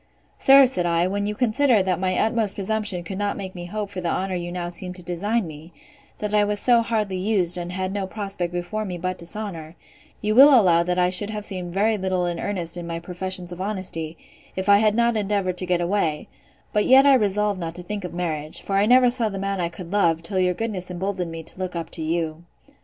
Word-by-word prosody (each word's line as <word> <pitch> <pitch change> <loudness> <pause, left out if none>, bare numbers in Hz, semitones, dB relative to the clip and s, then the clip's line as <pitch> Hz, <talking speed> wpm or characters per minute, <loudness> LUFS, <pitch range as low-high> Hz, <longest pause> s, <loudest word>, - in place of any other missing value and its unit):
Sir, 275 0 +7
said 180 -9 +1
I, 170 0 +2
when 200 +2 -1
you 210 - -3
consider, 245 -1 +3
that 185 -2 0
my 185 -1 0
utmost 220 -2 +1
presumption 205 -2 -2
could 190 +3 -6
not 205 0 -1
make 190 -2 -6
me 175 -1 -7
hope 205 +2 -5
for 185 - -5
the 175 - -1
honour 190 +2 -1
you 175 -1 -4
now 175 -1 -4
seem 180 +1 -3
to 180 -1 -9
design 200 +6 -1
me; 160 +1 -11 0.4
that 210 0 -3
I 210 0 +4
was 205 0 -1
so 240 0 +4
hardly 215 -4 -1
used, 185 -3 +1
and 175 0 -4
had 185 +1 -3
no 200 -2 -2
prospect 195 -4 -4
before 175 +5 -3
me 185 -4 -5
but 185 +1 -3
dishonour, 170 -3 -5 0.4
you 215 0 0
will 270 +2 +8
allow 175 -5 +4
that 180 +1 -1
I 180 0 +2
should 200 +3 +1
have 210 -1 -5
seemed 180 -3 -4
very 215 +2 +2
little 185 -1 0
in 175 -1 -3
earnest 175 -4 -3
in 170 -1 -6
my 165 0 -4
professions 180 +1 -2
of 175 +1 -7
honesty, 185 -5 -3 0.4
if 190 +1 -3
I 200 0 +6
had 215 -1 +3
not 235 0 +2
endeavoured 200 -3 -1
to 185 - -2
get 175 -1 +1
away: 170 -4 -1 0.5
but 210 - +2
yet 265 +2 +7
I 280 - +7
resolved 210 -4 +1
not 165 -1 -5
to 180 - -8
think 205 +1 -5
of 180 - -5
marriage; 160 -3 -2
for 195 - -2
I 200 +2 +3
never 250 0 +6
saw 240 -3 +1
the 195 - -6
man 195 -1 -2
I 170 - -1
could 170 0 -10
love, 165 -5 +2
till 190 +2 -1
your 180 -1 +2
goodness 200 -5 -3
emboldened 180 0 -3
me 165 0 -7
to 175 - -11
look 185 -1 -4
up 165 -1 -5
to 165 - -6
you. 160 0 -2
185 Hz, 240 wpm, -23 LUFS, 175-210 Hz, 0.5 s, will